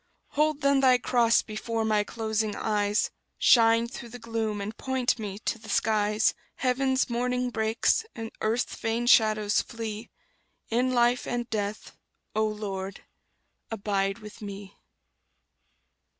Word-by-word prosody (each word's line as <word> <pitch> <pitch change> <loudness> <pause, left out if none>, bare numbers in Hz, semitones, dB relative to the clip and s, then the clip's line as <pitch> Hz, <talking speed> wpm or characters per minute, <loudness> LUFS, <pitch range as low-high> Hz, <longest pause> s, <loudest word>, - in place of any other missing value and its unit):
Hold 300 0 +1
then 280 0 +4
Thy 260 -2 +5
cross 240 -2 +3
before 225 +1 -3
my 215 -1 +2
closing 220 -1 -2
eyes; 205 -1 0 0.3
Shine 230 -1 +5
through 235 0 -9
the 245 - -8
gloom, 225 -2 -3
and 200 +2 -5
point 260 -2 0
me 200 -2 -5
to 230 - -1
the 220 0 -12
skies: 210 0 +2 0.2
Heaven's 260 0 +1
morning 250 +1 -1
breaks, 220 - +1
and 225 -1 -6
earth's 225 +3 0
vain 225 +1 -1
shadows 215 -3 +4
flee 225 -1 -6 0.6
In 250 +3 +2
life 240 0 +2
and 240 -1 -2
death, 210 -1 -3 0.4
O 215 0 +2
Lord, 200 -2 -5 0.7
abide 195 -2 -1
with 215 -1 -12
me! 200 -1 -8
225 Hz, 130 wpm, -27 LUFS, 210-240 Hz, 0.7 s, Thy